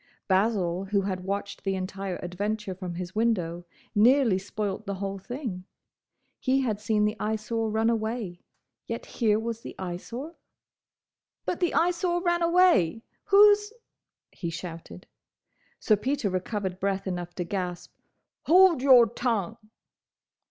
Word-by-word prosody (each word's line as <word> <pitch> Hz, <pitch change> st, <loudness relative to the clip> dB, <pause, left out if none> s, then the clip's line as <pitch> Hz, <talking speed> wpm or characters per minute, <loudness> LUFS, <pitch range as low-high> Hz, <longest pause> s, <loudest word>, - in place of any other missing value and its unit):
Basil, 190 Hz, -2 st, +1 dB
who 200 Hz, 0 st, +1 dB
had 185 Hz, -2 st, -3 dB
watched 200 Hz, +1 st, -4 dB
the 195 Hz, -1 st, 0 dB
entire 190 Hz, 0 st, -4 dB
adventure 205 Hz, +3 st, -3 dB
from 180 Hz, -2 st, -6 dB
his 180 Hz, +1 st, -6 dB
window, 180 Hz, -7 st, 0 dB, 0.3 s
nearly 230 Hz, -2 st, +4 dB
spoilt 205 Hz, +1 st, -4 dB
the 200 Hz, -, -2 dB
whole 195 Hz, 0 st, -4 dB
thing. 235 Hz, -4 st, -5 dB, 0.8 s
He 265 Hz, +1 st, +2 dB
had 220 Hz, -6 st, -1 dB
seen 210 Hz, 0 st, +2 dB
the 210 Hz, +1 st, 0 dB
Eyesore 220 Hz, +1 st, -1 dB
run 220 Hz, +1 st, +1 dB
away—yet 220 Hz, -5 st, -4 dB
here 215 Hz, -3 st, +1 dB
was 230 Hz, +1 st, -4 dB
the -, -, -9 dB
Eyesore—! 235 Hz, -, -6 dB, 1.1 s
"But 355 Hz, -, -2 dB
the 350 Hz, -, 0 dB
Eyesore 350 Hz, +1 st, +2 dB
ran 345 Hz, -1 st, +1 dB
away! 335 Hz, -, +4 dB, 0.2 s
Who's—?" 415 Hz, +1 st, +6 dB, 0.6 s
he 170 Hz, -, -5 dB
shouted. 165 Hz, -, -8 dB, 0.7 s
Sir 215 Hz, -, +3 dB
Peter 260 Hz, -2 st, -1 dB
recovered 185 Hz, 0 st, -3 dB
breath 195 Hz, 0 st, -1 dB
enough 175 Hz, -2 st, -4 dB
to 180 Hz, -, -2 dB
gasp, 180 Hz, -1 st, -4 dB, 0.5 s
"Hold 360 Hz, -4 st, +6 dB
your 260 Hz, -3 st, +7 dB
tongue!" 225 Hz, -3 st, -2 dB
210 Hz, 130 wpm, -27 LUFS, 185-240 Hz, 1.1 s, your